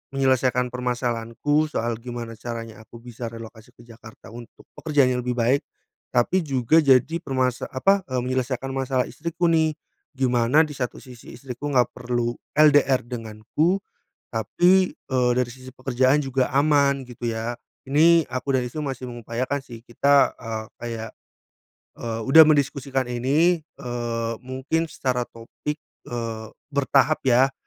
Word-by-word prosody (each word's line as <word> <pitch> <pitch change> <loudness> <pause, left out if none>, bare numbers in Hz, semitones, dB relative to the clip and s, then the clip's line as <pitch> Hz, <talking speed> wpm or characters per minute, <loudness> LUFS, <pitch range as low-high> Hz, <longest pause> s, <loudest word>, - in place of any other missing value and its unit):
menyelesaikan 130 -2 +2
permasalahanku 125 +4 -1
soal 120 -6 -2
gimana 120 -1 -6
caranya 115 -1 -6
aku 115 +2 -14
bisa 120 -1 -7
relokasi 115 -1 -11
ke 120 - -17
Jakarta 115 -1 -14
untuk 120 0 -12
pekerjaan 145 -5 +2
yang 125 - 0
lebih 125 0 -2
baik, 125 +4 +2 0.5
tapi 125 +10 +3
juga 135 +3 +3
jadi 140 +3 +3
permasa 130 -4 -1
apa 195 +9 +2
menyelesaikan 130 0 -2
masalah 130 -1 0
istriku 170 +7 -2
nih 160 -1 +2 0.4
gimana 125 +3 +3
di 155 - -5
satu 130 -4 -4
sisi 125 -2 -12
istriku 135 +1 -7
nggak 125 -3 +3
perlu 120 -1 -2 0.2
LDR 145 -3 +5
denganku 120 - -2 0.5
tapi, 180 +11 +2
eee, 130 -4 -1
dari 125 0 0
sisi 130 +1 -11
pekerjaan 130 +2 +2
juga 135 -2 -1
aman 140 0 +3
gitu 120 0 -9
ya. 115 +2 -3 0.3
Ini 165 +3 +5
aku 130 +2 -2
dan 130 - +2
istriku 125 +5 -4
masih 130 -2 -5
mengupayakan 120 +4 -3
sih 120 -4 -10
kita, 140 +4 +3
eee, 110 -2 -5
kayak, 115 -2 -6 0.9
eee, 115 -1 -3
udah 135 +5 +7
mendiskusikan 140 -2 +1
ini, 140 +8 +2
eee, 120 -6 -4
mungkin 130 +6 -2
secara 125 -4 -2
topik, 115 +6 -6 0.3
eee, 115 -2 -4 0.3
bertahap 140 +2 +2
ya, 130 +3 +4
130 Hz, 135 wpm, -24 LUFS, 120-140 Hz, 0.9 s, udah